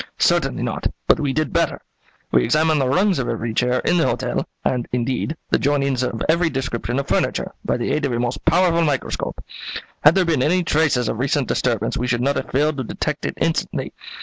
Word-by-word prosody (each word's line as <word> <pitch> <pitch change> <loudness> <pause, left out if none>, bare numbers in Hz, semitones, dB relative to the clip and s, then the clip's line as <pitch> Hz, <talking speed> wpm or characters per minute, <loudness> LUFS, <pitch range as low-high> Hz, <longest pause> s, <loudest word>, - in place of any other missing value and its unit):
"Certainly - - +2
not, - - -1 0.2
but - - +5
we 145 -2 0
did 155 +3 -1
better: 165 -2 +1 0.5
we - - +4
examined 155 +4 +2
the 130 - +1
rungs 185 +4 +2
of 125 - -2
every 115 0 -2
chair 125 +2 +1
in 175 - +2
the 165 - +3
hotel, - - -1 0.2
and, 125 -2 0
indeed, 125 +5 -1
the - - +3
jointings 140 -2 +1
of 115 -3 -2
every 170 +1 +3
description 130 -3 -3
of 140 - -2
furniture, - - 0
by - - 0
the 120 +2 -2
aid 150 +1 0
of 135 - -1
a 120 - -1
most 120 +1 -2
powerful 170 0 +3
microscope. 145 -5 -2 0.6
Had 150 +2 +7
there 190 -2 +3
been 160 -6 +1
any 180 +6 +2
traces 150 -7 +2
of 110 - -2
recent 135 +1 +1
disturbance 115 -3 0
we 125 - -1
should 120 -1 +1
not 140 +2 +1
have - - -3
failed 150 +2 +1
to 130 - -2
detect - - -3
it - - -4
instantly. - - -1
140 Hz, 210 wpm, -21 LUFS, 125-160 Hz, 0.6 s, Had